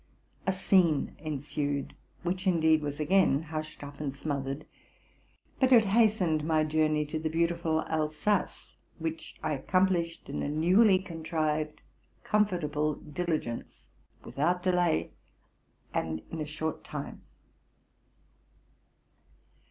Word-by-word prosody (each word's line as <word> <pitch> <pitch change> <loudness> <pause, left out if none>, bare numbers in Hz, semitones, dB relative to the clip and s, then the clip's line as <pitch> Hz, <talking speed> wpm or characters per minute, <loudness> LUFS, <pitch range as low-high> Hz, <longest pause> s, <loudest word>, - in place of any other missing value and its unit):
A - - +4
scene 185 -5 +2
ensued, 145 -1 -3 0.3
which, 185 +2 -2
indeed, 160 -3 +4
was 145 0 -4
again 155 -2 +3
hushed 155 -1 -6
up 145 0 -9
and 140 -3 -3
smothered; 140 0 -3 0.9
but 260 -1 +3
it 230 -4 +7
hastened 200 -7 +3
my 155 0 +2
journey 155 0 +1
to 155 +2 -3
the 160 0 -2
beautiful 165 0 +1
Al 155 -1 0
sace, 185 +7 -2 0.2
which 160 0 -5
I 155 - 0
accomplished 170 +2 0
in - - -4
a - - -1
newly 185 +7 +5
contrived 160 -4 -2 0.4
comfortable 155 -8 +1
diligence, 155 -6 -4 0.4
without 175 +5 0
delay, 180 - +2 0.8
and 80 -1 -2
in 165 - -4
a 150 - -3
short 155 +1 -4
time. - - -6
160 Hz, 115 wpm, -29 LUFS, 150-180 Hz, 0.9 s, it